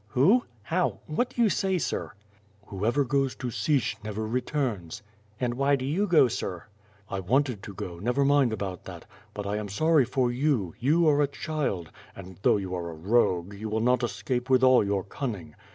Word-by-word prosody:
"Who? 170 - +3 0.2
How? 175 +10 0
What 195 +11 -1
do 240 - 0
you 220 - +4
say, 190 -1 0
sir." 170 - -3 0.5
"Whoever 110 +8 0
goes 135 0 0
to 125 - -4
Sich, 135 -4 0
never 110 +1 -4
returns." 115 - -2 0.4
"And 125 -2 0
why 140 +3 +2
do 130 -1 -4
you 180 +10 0
go, 155 -7 +5
sir?'' 95 -4 -4 0.4
"I 100 - -3
wanted 125 +3 0
to 100 - -9
go, 85 -2 -6
never 125 +7 +1
mind 140 -3 +4
about 95 -4 -5
that; - - -9 0.3
but 105 - -5
I 100 +1 -1
am 105 -1 -4
sorry 155 - +3
for 125 -1 0
you; 120 - 0
you 155 +7 +3
are 150 -1 +4
a 145 - +3
child, 140 - -3 0.2
and 95 -1 -11
though - - +4
you 95 -2 -4
are 85 -2 -3
a 80 - -8
rogue, 95 0 +1
you 110 +2 -6
will 110 +1 0
not 125 +3 +2
escape 125 +1 -2
with 130 -1 +4
all 130 -2 +6
your 100 -1 -1
cunning. 100 - -5
120 Hz, 195 wpm, -27 LUFS, 100-140 Hz, 0.5 s, all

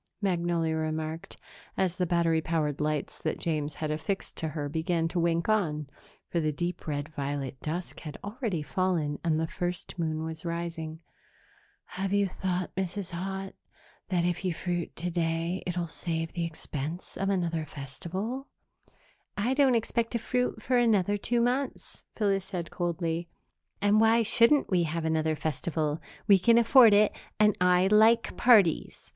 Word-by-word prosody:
Magnolia 170 -4 0
remarked, 155 +1 -3 0.4
as 185 -2 0
the 180 -2 0
battery 165 -1 +2
powered 155 -3 -1
lights 150 -1 -2
that - - -2
James 150 -3 -2
had 155 -1 -3
affixed 160 +6 -3
to 160 - -2
her 150 -1 -3
began 165 +2 0
to 175 - -1
wink 170 0 +1
on, 160 -9 +1 0.4
for 170 - -1
the 155 -1 +1
deep 175 +4 -4
red 145 -1 -2
violet 140 -3 -4
dusk 170 +4 -4
had 150 -3 -8
already 205 - -3
fallen 165 -4 0
and 160 -2 +1
the 160 - +1
first 175 +2 -4
moon 160 -1 -1
was 160 0 -6
rising. 170 -1 -4 0.8
"Have 190 +1 -3
you 200 -1 +3
thought, 185 -1 -3
Mrs. 190 0 -3
Haut, 195 +2 -4 0.6
that 175 -2 +1
if 175 +1 -1
you 180 -3 -1
fruit 175 -1 -3
today, 170 +1 -1
it 180 0 -2
will 175 - 0
save 165 0 -3
the 170 -1 -1
expense 160 0 -6
of 195 - -1
another 170 -4 0
festival?" 185 - -5 0.9
"I 230 +6 +1
don't 265 -3 +4
expect 230 0 0
to - - +2
fruit 250 +2 -1
for 255 - +2
another 205 -4 +3
two 235 +4 0
months," 250 +3 -2
Phyllis 195 -3 +1
said 175 -4 -5
coldly, 170 -1 -2 0.5
"and 205 +1 +5
why 225 +1 +5
shouldn't 235 +6 +5
we 180 -2 +4
have 165 0 -2
another 160 0 +1
festival? 155 0 -2 0.3
We 200 -2 +7
can 230 +5 +5
afford 235 -2 +7
it 210 +1 +5 0.3
and 210 -1 +5
I 180 0 +5
like 220 +3 +4
parties. 210 -10 +3
175 Hz, 160 wpm, -29 LUFS, 160-200 Hz, 0.9 s, We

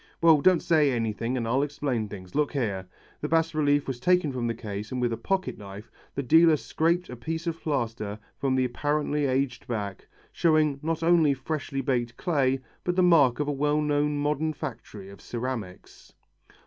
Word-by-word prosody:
"Well, 160 -3 +6
don't 185 +1 +4
say 155 -4 +3
anything 115 +1 -1
and 115 -2 -2
I'll 130 +4 +2
explain 140 -6 -2
things 95 -3 -10
look 150 -1 0
here." 100 -9 -2 0.3
The 150 - -3
bas 165 0 +2
relief 145 -2 +2
was 130 -3 -4
taken 180 +1 +2
from 125 -2 -2
the 115 - -2
case 105 -2 -6
and 130 - -2
with 120 -2 0
a - - 0
pocketknife 115 - -4 0.2
the 140 - -2
dealer 160 +3 +6
scraped 170 +4 0
a - - -6
piece 160 +8 -4
of 165 -1 -3
plaster 115 -8 -2 0.2
from 135 -1 0
the 130 -1 +2
apparently 145 +3 0
aged 130 -1 -1
back, 100 -5 -4 0.2
showing 155 -4 +2
not 165 +1 -2
only 165 -4 +4
freshly 135 -1 -3
baked 120 -3 -1
clay 135 -6 +1 0.2
but 180 - -1
the 185 - +3
mark 145 -9 +5
of 145 - 0
a - - +1
well 145 +1 +1
known 150 0 +1
modern 150 +2 0
factory 115 -9 -7
of 100 - -14
ceramics. 115 -6 -6
140 Hz, 185 wpm, -27 LUFS, 120-155 Hz, 0.3 s, Well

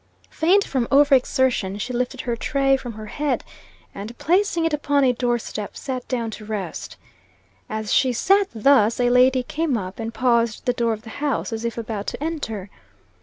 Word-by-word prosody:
Faint 370 +5 +3
from 255 -4 -1
over 285 +1 +5
exertion, 255 -6 +2
she 245 +5 -4
lifted 245 +1 -2
her 240 -2 -2
tray 270 +3 +2
from 245 -3 -6
her 215 0 -8
head, 290 +6 -2 0.5
and 215 +4 -8
placing 345 -1 +1
it 325 - 0
upon 285 -1 +1
a 255 -2 +4
door 240 0 0
step, 215 -2 -6
sat 255 -2 -5
down 235 -3 -2
to 215 - -9
rest. 210 -5 -5 0.7
As 215 -1 -2
she 260 - +4
sat 390 - +3
thus, 230 -1 +4
a 245 0 +3
lady 255 +1 +4
came 305 -1 -1
up, 185 0 -6
and 225 0 -3
paused 235 -3 +1
at - - -36
the 245 - +2
door 235 -2 0
of 215 0 -8
the 220 - -10
house, 285 -5 -1
as 225 +1 -4
if 235 -1 -3
about 215 -3 -4
to - - -4
enter. 225 - -4
245 Hz, 195 wpm, -22 LUFS, 220-275 Hz, 0.7 s, over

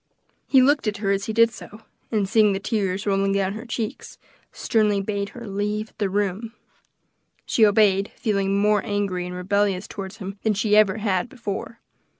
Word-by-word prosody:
He 265 -2 +5
looked 285 -2 +2
at 210 0 -1
her 200 -1 -1
as 200 0 0
he - - -3
did 230 +1 +4
so, 215 0 -12 0.3
and 210 -4 +1
seeing 210 0 +4
the 195 - -2
tears 200 -2 -2
rolling 195 -1 +1
down 195 -1 0
her 225 +3 -8
cheeks, 230 -2 -5 0.3
sternly 210 -3 +1
bade 200 0 -3
her 235 +2 -10
leave 210 +2 -3
the 200 -2 0
room, 205 +3 -2 0.9
She 220 -2 +4
obeyed, 200 -1 +3
feeling 200 -2 0
more 210 0 +2
angry 195 -3 -2
and 180 - -6
rebellious 195 +1 0
toward 195 -1 -7
him 195 -2 -8
than 220 -2 +1
she 210 +1 +2
ever 215 -1 +4
had 200 -1 -1
before. 235 -1 -6
205 Hz, 175 wpm, -23 LUFS, 195-220 Hz, 0.9 s, He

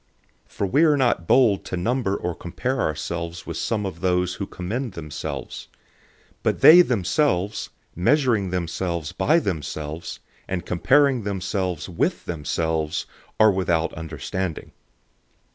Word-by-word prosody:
010:012 - - -28
For - - -2
we 140 - +3
are 150 -3 +5
not 120 -10 +1
bold 115 -7 +4
to 95 - -4
number 110 +1 0
or 90 - -3
compare 125 +11 -3
ourselves 85 +2 -3
with 85 - -5
some 105 -3 -1
of 90 -3 -5
those 90 -1 +1
who 100 - -5
commend 110 +6 -4
themselves. 75 -4 -6 0.7
But - - 0
they 175 +3 +10
themselves, 105 - 0 0.3
measuring 115 - +2
themselves 85 -2 -2
by 160 - +2
themselves, 80 - -4 0.3
and 90 -2 -3
comparing 135 +7 +3
themselves 95 -3 -2
with 90 -3 -1
themselves, 80 0 -2 0.3
are 110 -1 +7
without 85 -4 0
understanding. 80 +2 -5
95 Hz, 125 wpm, -23 LUFS, 85-115 Hz, 0.7 s, they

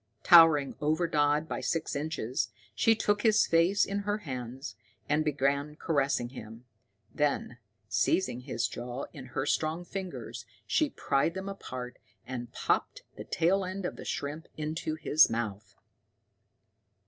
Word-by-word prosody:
Towering 165 -5 +7
over 155 +4 +1
Dodd 150 -1 +2
by - - -4
six 165 -2 -1
inches, 140 -4 -2 0.2
she 225 - +4
took 205 -1 +1
his 215 -1 +4
face 170 +5 +3
in 200 0 -2
her 205 +1 -1
hands 130 - -6 0.3
and 150 +2 +2
began 145 0 0
caressing 140 -6 0
him; 115 -1 -10 0.5
then, 145 -4 -1 0.3
seizing 120 - +1
his 120 -3 -2
jaws 120 +4 -6
in 135 -3 -9
her 135 +2 -2
strong 160 +3 0
fingers, 190 -1 -6 0.2
she 310 -2 +2
pried 140 - 0
them 190 +1 -5
apart, 130 -10 -7 0.3
and 120 -2 -6
popped - - -1
the - - -7
tail 190 +4 +2
end 185 +1 -4
of - - -3
the - - -9
shrimp 150 +3 -4
into 155 0 -3
his 155 0 +5
mouth. 105 -3 -4
150 Hz, 140 wpm, -30 LUFS, 130-175 Hz, 0.5 s, Towering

